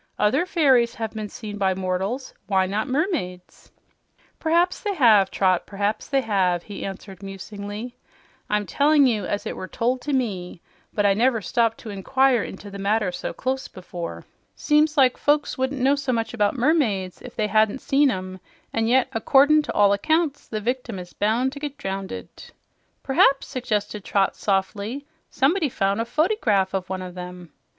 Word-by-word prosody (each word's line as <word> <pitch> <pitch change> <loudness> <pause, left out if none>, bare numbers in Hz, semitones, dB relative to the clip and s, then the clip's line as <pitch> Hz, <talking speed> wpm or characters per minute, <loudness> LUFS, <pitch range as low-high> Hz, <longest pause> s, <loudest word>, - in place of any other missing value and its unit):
"Other 270 +12 +2
fairies 260 -9 +3
have 225 -3 -4
been 215 -2 -5
seen 205 -2 -7
by 190 -1 +2
mortals; 190 +7 -3
why 190 -2 +2
not 205 +5 -2
mermaids?" 260 - -3 0.7
"P'raps 340 +3 +2
they 410 -2 -2
have, 215 - +5
Trot, 185 -2 +1
p'raps 205 +2 -2
they 275 -1 +1
have," 185 -6 +1
he 205 - -8
answered 195 0 -8
musingly. 205 +4 -7 0.5
"I'm 210 0 +1
tellin' 285 - +4
you 225 -5 +1
as 205 - -2
it - - -4
was 185 - -7
told 250 +2 0
to 295 - -3
me, 200 -10 -2 0.3
but 205 - 0
I 200 - +5
never 235 +3 +2
stopped 225 +3 0
to 220 - -7
inquire 255 +5 +2
into 200 +1 -9
the 200 - -8
matter 200 -1 +1
so - - -4
close 265 +1 -3
before. 175 -2 -7 0.3
Seems 300 0 +2
like 260 -2 +4
folks 295 +1 +1
wouldn't 260 +1 -2
know 265 +2 +4
so 280 -2 -1
much 230 -1 -1
about 210 +1 +1
mermaids 235 - +1
if 250 - -10
they 215 - 0
hadn't 215 +3 +2
seen 275 +2 +3
'em; 185 -3 -4 0.3
an' 225 0 +1
yet 255 +2 +3
accordin' 280 +6 +4
to - - -5
all 200 -1 +4
accounts 310 +7 0
the 215 - -3
victim 240 -1 -3
is 180 -1 -9
bound 235 +6 +1
to 285 - -8
get 290 -1 -5
drownded." 190 - -5 0.8
"P'raps," 270 0 +3
suggested 210 -5 -3
Trot 195 0 +1
softly, 205 +7 -2 0.2
"someone 305 +4 +1
found 200 -2 0
a - - -2
fotygraph 235 - +1
of 185 -1 -3
one 185 -1 -3
of 180 -1 -8
'em." 180 -1 -9
220 Hz, 175 wpm, -23 LUFS, 195-270 Hz, 0.8 s, have